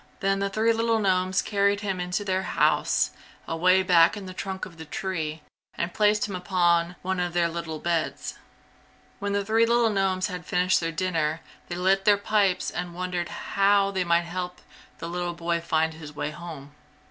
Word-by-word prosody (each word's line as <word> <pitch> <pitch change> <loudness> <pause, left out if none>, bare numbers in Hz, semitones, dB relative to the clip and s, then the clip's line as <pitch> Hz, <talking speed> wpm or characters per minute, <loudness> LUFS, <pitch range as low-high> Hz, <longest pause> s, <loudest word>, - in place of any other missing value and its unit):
Then 195 0 +1
the 200 0 0
three 220 +3 +2
little 225 0 +1
gnomes 185 -2 +1
carried 200 0 +1
him 195 -3 -2
into 180 +3 -2
their 190 -1 0
house, - - +2 0.4
away 185 +3 +3
back 175 +1 +5
in 200 - -7
the 185 - -7
trunk 190 +1 -4
of 170 -3 -13
the 160 - -8
tree, 160 -2 -4 0.3
and 170 +1 -3
placed 210 0 +2
him 200 - -5
upon 175 -1 +1
one 190 0 -1
of 175 -1 -1
their 175 -1 +2
little 165 -1 -5
beds. 165 0 -2 0.8
When 200 0 -2
the 200 0 0
three 225 +2 +3
little 235 -1 +3
gnomes 190 -2 +1
had 180 -3 -5
finished 180 0 +2
their 165 -1 -2
dinner 165 -3 -1 0.3
they 175 - -4
lit 190 +2 +2
their 205 -1 +6
pipes 200 -2 +1
and 175 -1 -5
wondered 180 -1 -3
how 200 0 +2
they 190 -2 0
might 170 -1 +3
help 180 +1 -5 0.4
the 165 - -6
little 175 0 -3
boy 170 0 -1
find 160 -1 +1
his 150 -2 -10
way 150 +1 -3
home. 155 -3 -9
185 Hz, 185 wpm, -26 LUFS, 170-195 Hz, 0.8 s, their